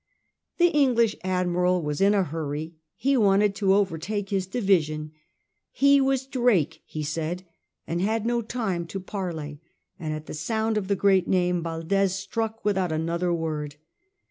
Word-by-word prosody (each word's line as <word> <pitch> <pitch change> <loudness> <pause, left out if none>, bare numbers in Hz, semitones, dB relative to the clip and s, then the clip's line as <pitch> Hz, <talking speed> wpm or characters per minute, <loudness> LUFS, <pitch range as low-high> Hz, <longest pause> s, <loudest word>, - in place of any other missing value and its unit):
The 350 0 +5
English 245 -8 +3
Admiral 180 -1 +1
was 150 +1 -2
in 200 +1 +5
a 195 - +3
hurry; 155 0 -4 0.2
he 275 +1 +1
wanted 205 -3 +4
to 195 -2 +3
overtake 200 +1 -1
his 190 -2 -1
division; 160 -8 +1 0.6
he 280 0 +4
was 270 -1 +1
Drake, 220 - +1
he 155 - -5
said, 160 +4 -3 0.4
and 170 +1 -2
had 220 +2 0
no 240 0 +1
time 205 -7 -3
to 195 - -5
parley; 165 -7 -5 0.4
and 155 -3 -3
at 155 0 -5
the - - -7
sound 220 +6 -1
of 205 -3 -1
the 200 - +2
great 190 -2 +3
name 180 -1 +1
Valdes 175 +4 0
struck 220 +3 -4
without 190 -4 +1
another 170 +3 -1
word. 155 -3 -3
185 Hz, 155 wpm, -25 LUFS, 165-215 Hz, 0.6 s, The